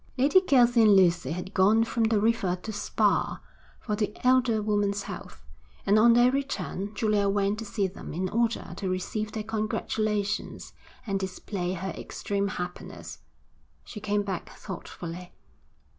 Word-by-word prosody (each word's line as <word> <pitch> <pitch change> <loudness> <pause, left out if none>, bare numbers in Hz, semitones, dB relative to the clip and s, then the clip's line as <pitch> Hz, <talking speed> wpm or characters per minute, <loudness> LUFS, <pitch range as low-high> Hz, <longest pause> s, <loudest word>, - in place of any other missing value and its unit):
Lady 290 +9 +5
Kelsey 245 -8 +4
and 210 -2 +7
Lucy 175 -3 +4
had 180 +4 -5
gone 210 +4 +4
from 230 0 0
the 220 -1 +2
River 210 -4 +1
to 220 - -5
Spa, 205 - +1 0.4
for 210 - -2
the 210 0 -2
elder 250 -3 +4
woman's 205 -1 0
health, 65 - -9 0.4
and 205 +2 +4
on 235 +2 +7
their 240 +1 +5
return 270 -7 -3
Julia 205 -1 +2
went 200 +1 +1
to 225 - -5
see 205 -1 -1
them 190 +1 -7
in 185 +4 -2
order 235 0 -1
to 190 - -3
receive 210 +4 -3
their 220 - -3
congratulations 215 -1 -2 0.3
and 195 -3 -1
display 185 -1 -4
her 190 +1 -4
extreme 200 0 -3
happiness. 180 -2 -6 0.6
She 215 - -9
came 205 0 0
back 190 -4 -4
thoughtfully. 175 -2 -8
205 Hz, 150 wpm, -27 LUFS, 190-225 Hz, 0.6 s, and